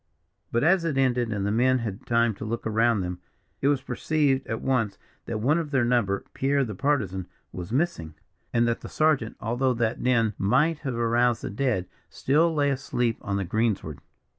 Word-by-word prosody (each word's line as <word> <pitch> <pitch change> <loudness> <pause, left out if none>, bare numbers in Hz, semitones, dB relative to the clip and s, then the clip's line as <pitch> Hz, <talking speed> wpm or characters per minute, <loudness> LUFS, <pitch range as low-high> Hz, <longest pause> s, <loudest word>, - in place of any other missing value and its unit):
But 120 - +1
as 175 +2 +4
it 160 -5 -1
ended, 125 -3 +1
and 100 -2 -2
the 100 - 0
men 130 +4 +3
had 110 -5 -5
time 115 -1 +2
to - - -7
look 115 +2 -4
around 110 -1 +2
them, 90 0 -4 0.4
it 135 - +2
was 145 -2 +2
perceived 135 +1 0
at 110 - -3
once 115 -7 0 0.3
that 115 - -3
one 150 +8 +3
of 160 -3 -4
their 135 -4 +2
number 115 -5 +1
Pierre, 140 +1 +1
the 110 - -5
Partisan 100 - -1 0.2
was 90 +3 -7
missing, 125 - -1 0.4
and 120 0 +2
that 115 - -1
the - - -8
sergeant, 155 -8 +1
although 120 +3 0
that 115 -1 -1
din 115 -4 +2
might 145 +11 +2
have 130 -5 -4
aroused 120 0 +1
the - - -4
dead, 110 -5 -1 0.2
still 160 +5 +2
lay 145 -3 +1
asleep 125 -4 -1
on 100 0 -2
the 100 - -2
greensward. 100 - -1
120 Hz, 190 wpm, -26 LUFS, 110-135 Hz, 0.4 s, as